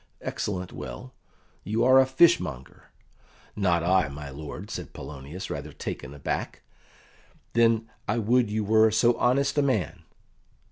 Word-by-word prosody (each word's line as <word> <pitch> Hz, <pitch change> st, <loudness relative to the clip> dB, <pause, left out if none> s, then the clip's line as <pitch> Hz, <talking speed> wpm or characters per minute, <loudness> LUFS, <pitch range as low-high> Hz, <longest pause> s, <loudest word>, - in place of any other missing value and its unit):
"Excellent 90 Hz, -3 st, -4 dB
well; 60 Hz, 0 st, -8 dB, 0.5 s
you 110 Hz, +3 st, 0 dB
are 130 Hz, +1 st, +7 dB
a 130 Hz, -, +4 dB
fishmonger." 130 Hz, -, +2 dB, 0.7 s
"Not 90 Hz, -4 st, +1 dB
I, 90 Hz, -1 st, +3 dB
my 70 Hz, 0 st, -8 dB
lord," 75 Hz, +8 st, -8 dB
said -, -, -6 dB
Polonius, 75 Hz, +7 st, -8 dB
rather 75 Hz, +1 st, -5 dB
taken 65 Hz, -, -6 dB
aback. 70 Hz, -, -4 dB, 0.9 s
"Then 115 Hz, -1 st, +3 dB, 0.2 s
I -, -, 0 dB
would 120 Hz, +1 st, +2 dB
you 110 Hz, +1 st, -1 dB
were 110 Hz, +1 st, +5 dB
so 115 Hz, +2 st, +3 dB
honest 140 Hz, +4 st, +2 dB
a -, -, +5 dB
man." 130 Hz, -9 st, -1 dB
105 Hz, 135 wpm, -26 LUFS, 75-120 Hz, 0.9 s, are